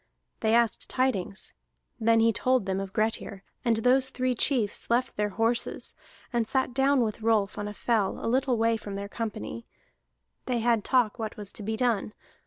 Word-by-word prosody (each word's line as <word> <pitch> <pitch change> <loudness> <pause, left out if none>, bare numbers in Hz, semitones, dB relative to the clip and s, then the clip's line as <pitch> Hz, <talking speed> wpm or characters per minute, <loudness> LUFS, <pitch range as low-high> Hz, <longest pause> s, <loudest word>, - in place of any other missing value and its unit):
They 220 0 +2
asked 235 -2 +1
tidings. 215 -7 -1 0.5
Then 225 0 +4
he 230 0 +4
told 255 -3 +2
them 190 0 -1
of 195 -1 -5
Grettir, 215 -2 -1 0.2
and 235 -3 +2
those 255 +3 +3
three 255 -1 0
chiefs 235 -4 +1
left 240 +2 +1
their 210 0 0
horses, 230 +3 -1 0.4
and 235 -2 +1
sat 260 -1 0
down 270 +1 +3
with 220 -1 -2
Rolf 215 -3 +2
on 205 - -3
the 210 - -5
fell 215 -4 0
a - - -6
little 255 +1 +1
way 230 0 +2
from 205 -2 -7
their 200 0 -4
company; 225 +2 -5 0.8
they 250 -2 +1
had 230 -2 +2
talk 245 -2 +2
what 220 +1 -4
was 205 -2 -8
to - - -9
be 220 +2 -2
done. 230 -4 0
225 Hz, 185 wpm, -27 LUFS, 210-245 Hz, 0.8 s, Then